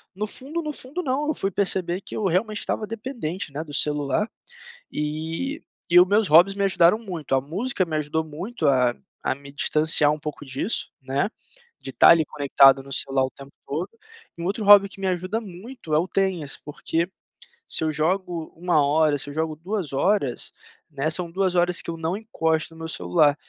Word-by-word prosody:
no 210 +2 -3
fundo, 285 +10 -5
no 305 -2 -4
fundo. 290 +5 -5
não. 280 0 -1
Eu - - +2
fui 195 - -1
perceber 190 -2 +1
que - - -8
eu 215 - -2
realmente 205 +4 0
estava 215 - -2
dependente, 210 - -5
né, 150 +3 -4
do 150 -2 -12
celular, 150 - 0 0.6
e 160 - -3 0.3
e 175 - +8
o 180 - +6
meus 205 +2 +3
hobbies 175 +6 +6
me 200 - 0
ajudaram 190 +1 +4
muito, 175 -11 -4
a 130 - +2
música 190 - -1
me 165 - -6
ajudou 155 +1 -1
muito 165 +5 -4
a 125 -3 +3 0.3
a - - +2
me 140 +1 -13
distanciar 150 +1 +3
um 150 - -4
pouco 150 -1 -7
disso, 135 - -2
né, 135 +8 -1 0.5
de 135 - -6
estar 120 - +6
ali 165 -1 +6
conectado 135 -2 +4
no 135 0 -11
celular 135 0 +1
o 130 - -3
tempo 140 0 -12 0.2
todo, 160 +7 -3 0.5
e 170 - -7
um - - -3
outro 205 +3 -2
hobby 205 -1 +9
que 195 - -12
me 195 - -2
ajuda 185 +5 -1
muito 195 -2 -7
é 150 - +5
o 175 - 0
tenis, 180 -6 -1
porque 165 +3 -2 0.6
se - - +1
eu 155 - +1
jogo 170 +1 -1
1 170 -4 +2
hora, 150 +1 +3
se 145 - -4
eu 145 - -8
jogo 160 -1 -2
2 180 -2 -4
horas, 140 -4 0 0.4
né, 145 +1 -2
são 170 +2 0
2 185 +1 0
horas 175 0 +2
que - - -14
eu 165 - -5
não 165 +3 -2
encosto 165 -8 -1
no 160 - -14
meu 160 - -5
celular, 155 -3 +2
170 Hz, 200 wpm, -24 LUFS, 150-195 Hz, 0.6 s, hobby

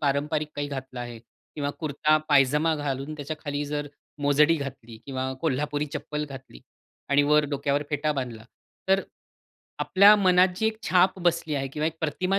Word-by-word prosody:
पारंपरिक 150 +2 0
काही 145 0 -2
घातलं 130 -2 -6
आहे 120 -1 -7
किंवा 145 +5 -7
कुर्ता-पायजामा 150 0 +2
घालून 145 0 -3
त्याच्याखाली 145 0 -4
जर 145 0 -3 0.3
मोजडी 150 +3 +4
घातली 130 -5 -7
किंवा 130 -1 -3
कोल्हापुरी 150 0 -1
चप्पल 150 0 -4
घातली 135 - -11 0.5
आणि 140 +1 +4
वर 150 +1 +4
डोक्यावर 140 0 0
फेटा 150 +1 0
बांधला. 125 -6 -5 0.4
तर 195 0 +4 0.8
आपल्या 200 +2 +6
मनात 185 -2 +5
जी 220 - +1
एक 220 0 -1
छाप 185 +1 +3
बसली 170 -3 0
आहे 135 -1 -2
किंवा 150 +3 -2
एक 160 - -2
प्रतिमा 180 +5 0
145 Hz, 150 wpm, -26 LUFS, 140-155 Hz, 0.8 s, आपल्या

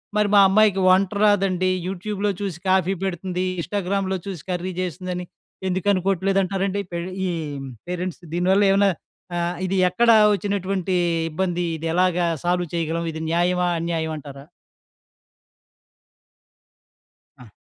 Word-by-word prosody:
మరి, 210 -1 +3
మా 200 - +8
అమ్మాయికి 200 -1 +4
వంట 190 0 +4
రాదండి 190 -3 +3 0.2
యూట్యూబ్‌లో 200 +2 -2
చూసి 190 -5 -3
కాఫీ 190 0 +3
పెడుతుంది. 185 0 -2 0.2
ఇన్స్టాగ్రామ్‌లో 190 +1 -1
చూసి 190 -7 -6
కర్రీ 180 +1 -2
చేస్తుందని 180 0 -4 0.4
ఎందుకు 185 +2 -2
అనుకోవట్లేదంటారండి? 195 +1 0
పెర్ 170 +1 -3 0.2
ఈ - - -1 0.6
పేరెంట్స్ 180 0 -4
దీని 175 +1 0
వల్ల 205 +1 +4
ఏమనా 200 +1 +4 0.5
ఆహ్, 175 +1 -1
ఇది 190 +1 -1
ఎక్కడ 235 +6 +2 0.2
వచ్చినటువంటి 195 -1 -1 0.4
ఇబ్బంది. 175 +1 -1
ఇది 165 +1 -4
ఎలాగా 180 0 +2 0.2
సాల్వ్ 175 0 +1
చేయగలం 165 0 -1
ఇది 160 0 -6
న్యాయమా, 180 +1 +2
అన్యాయం 165 -1 -2
అంటారా? 140 -1 -10 3.0
ఆ! 125 -4 -14
185 Hz, 120 wpm, -23 LUFS, 175-195 Hz, 3.0 s, మా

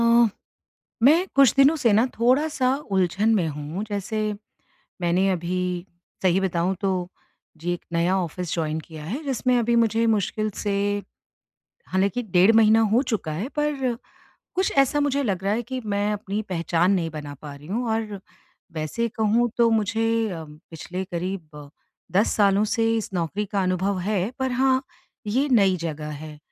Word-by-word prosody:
अ, 235 0 +5 0.7
मैं 285 +5 +8 0.2
कुछ 275 -5 +6
दिनों 275 +3 +6
से 265 -8 +2
न 220 +4 +4
थोड़ा-सा 255 +1 +2 0.2
उलझन 190 +4 +2
में 180 -6 +1
हूँ 150 +7 -5
जैसे 205 +1 -3 0.8
मैंने 180 +3 +2
अभी 180 0 -2 0.6
सही 185 0 +3
बताऊँ 185 0 0
तो 195 - +1 0.7
जी 175 +1 -1
एक 175 - -6
नया 170 +3 +2
ऑफिस 175 0 -4
जॉइन 160 -2 -1
किया 155 -1 -10
है 245 - -4
जिसमें 255 -2 +1
अभी 235 0 +2
मुझे 225 +1 +1
मुश्किल 215 +1 -1
से 205 -2 -1 1.2
हालाँकि 195 +6 +1
डेढ़ 185 +5 +7
महीना 220 0 +5
हो 245 - +4
चुका 175 -8 -2
है 190 +11 -3
पर 275 -5 0 0.6
कुछ 375 +1 +1
ऐसा 280 +2 -1
मुझे 285 -1 +1
लग 190 -6 -2
रहा 200 +1 +1
है 230 - 0
कि 260 - -2
मैं 205 +1 0
अपनी 205 0 -3
पहचान 170 +1 +1
नहीं 170 -4 0
बना 150 -2 -7
पा 150 -2 -8
रही 145 +2 -14
हूँ 230 +7 -2
और 215 -3 -3 0.6
वैसे 155 +10 -1
कहूँ 230 +3 +3
तो 235 -1 +5
मुझे 225 +2 -1 0.2
अ, 165 -4 -5
पिछले 165 +4 -8
करीब 170 -5 -6 0.5
10 210 - +3
सालों 200 -1 +4
से 225 0 +2
इस 220 - -3
नौकरी 180 +4 -2
का 200 -2 +1
अनुभव 185 +1 0
है 200 -1 0
पर 260 0 0
हाँ, 260 +1 +2 0.5
ये 260 +7 +1
नई 190 -2 +3
जगह 150 -1 -5
है। 155 -1 -9
200 Hz, 165 wpm, -24 LUFS, 175-235 Hz, 1.2 s, मैं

